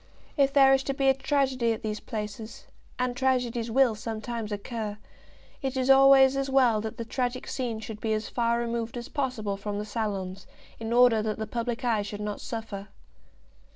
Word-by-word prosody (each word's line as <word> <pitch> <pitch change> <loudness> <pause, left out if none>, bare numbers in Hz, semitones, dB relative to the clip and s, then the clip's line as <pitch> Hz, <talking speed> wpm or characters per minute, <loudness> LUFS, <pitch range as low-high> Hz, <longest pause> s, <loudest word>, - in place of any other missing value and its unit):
If 275 -2 +3
there 270 -1 +6
is 270 - +3
to 275 - -2
be 270 0 +3
a - - +6
tragedy 265 -3 +1
at 225 - -8
these 215 -1 -3
places, 215 +1 -6 0.3
and 250 -1 -1
tragedies 245 -3 0
will 255 0 +4
sometimes 220 0 -5
occur, 210 0 -4 0.6
it 265 -2 -2
is 260 +1 +3
always 270 0 +7
as 275 0 -1
well 250 -5 +4
that 220 0 -6
the 230 - -4
tragic 250 +1 -2
scene 240 -4 -3
should 220 -1 -7
be 220 - -1
as 215 0 -2
far 235 -1 0
removed 235 0 -3
as 240 - -6
possible 235 -8 -2
from 205 +1 -4
the 210 - -3
salons, 195 -3 -4 0.3
in 225 0 -4
order 240 -2 +5
that 215 -1 -2
the 220 - -3
public 235 +2 -3
eye 225 -3 +2
should 205 0 -6
not 210 -1 -4
suffer. 220 -4 -6
235 Hz, 190 wpm, -27 LUFS, 215-260 Hz, 0.6 s, always